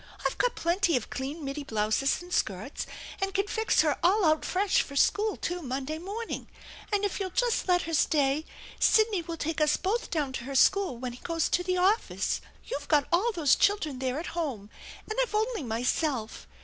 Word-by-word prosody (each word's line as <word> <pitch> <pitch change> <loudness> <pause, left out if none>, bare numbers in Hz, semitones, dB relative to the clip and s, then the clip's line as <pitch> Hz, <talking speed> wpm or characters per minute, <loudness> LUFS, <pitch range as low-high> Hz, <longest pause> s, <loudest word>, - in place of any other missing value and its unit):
I've - - -1
got - - +2
plenty 340 -2 +2
of 240 - -6
clean 285 +4 -4
middy 275 +2 -4
blouses 220 +6 0
and 355 0 -9
skirts 210 +8 -2 0.3
and 390 0 -1
can 395 0 +2
fix 445 +2 +2
her 300 -3 +1
all 380 +3 +4
out 310 0 +3
fresb 385 +2 +1
for 280 - -8
school, 420 +8 +2
too, 355 +1 -3
Monday 275 +2 -3
morning, 415 +6 -5 0.4
and 410 0 +1
if 405 - -2
you'll 385 -2 -2
just 480 +4 0
let 355 -1 +3
her 330 - -5
stay 290 -1 +2 0.4
Sidney 435 -4 +4
will 335 0 -6
take 320 0 -2
us 300 -1 +3
both 430 +6 -1
down 290 -5 -1
to 240 - -5
her 275 +1 -5
school 380 -1 +4
when 250 0 -5
he 245 - -11
goes 330 -1 -1
to 355 - +2
the 365 +1 -1
office. 390 +5 +1 0.2
You've 285 0 -5
got 295 -3 +3
all 390 +8 +3
those 315 -7 +4
children 315 -10 +1
there 260 0 -1
at 340 - -6
home, 260 -12 -3 0.4
and 435 +3 -3
I've - - -1
only 440 -1 0
myself. 245 0 -2
330 Hz, 200 wpm, -28 LUFS, 275-395 Hz, 0.4 s, all